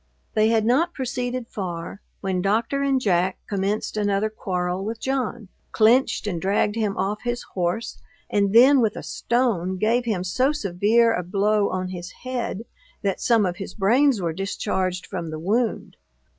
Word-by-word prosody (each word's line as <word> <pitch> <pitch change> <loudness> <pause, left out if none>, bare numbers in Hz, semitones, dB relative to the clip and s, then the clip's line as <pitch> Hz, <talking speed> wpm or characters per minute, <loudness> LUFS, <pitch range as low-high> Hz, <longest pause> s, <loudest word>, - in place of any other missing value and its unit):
They 215 0 +3
had 225 -1 +2
not 310 +9 +2
proceeded 255 -2 -3
far, 180 -2 -6 0.2
when 185 -2 -1
Doctor 225 +8 0
and 275 -1 +2
Jack 185 -5 +1
commenced 200 +2 -2
another 205 0 0
quarrel 180 -3 -2
with 220 +2 -4
John, 245 -6 -2 0.2
clenched 235 +4 +3
and 175 -5 -3
dragged 205 +2 +1
him 215 -3 -1
off 205 +2 -1
his 240 0 -2
horse, 185 +5 -2 0.3
and 200 -1 +1
then 260 +5 +7
with 220 -2 +1
a - - -6
stone 205 -7 0
gave 230 +5 +1
him 205 -6 -1
so 255 +10 +1
severe 225 0 +2
a 205 - -1
blow 200 +3 +1
on 185 0 -3
his 175 -1 -6
head, 245 -4 -3 0.4
that 195 -2 -1
some 230 -4 +3
of 175 -1 -2
his 195 - -7
brains 240 +5 +3
were 170 -3 -2
discharged 185 0 -2
from 175 -4 -5
the 155 - -5
wound. 220 +8 -1
210 Hz, 165 wpm, -23 LUFS, 185-235 Hz, 0.4 s, then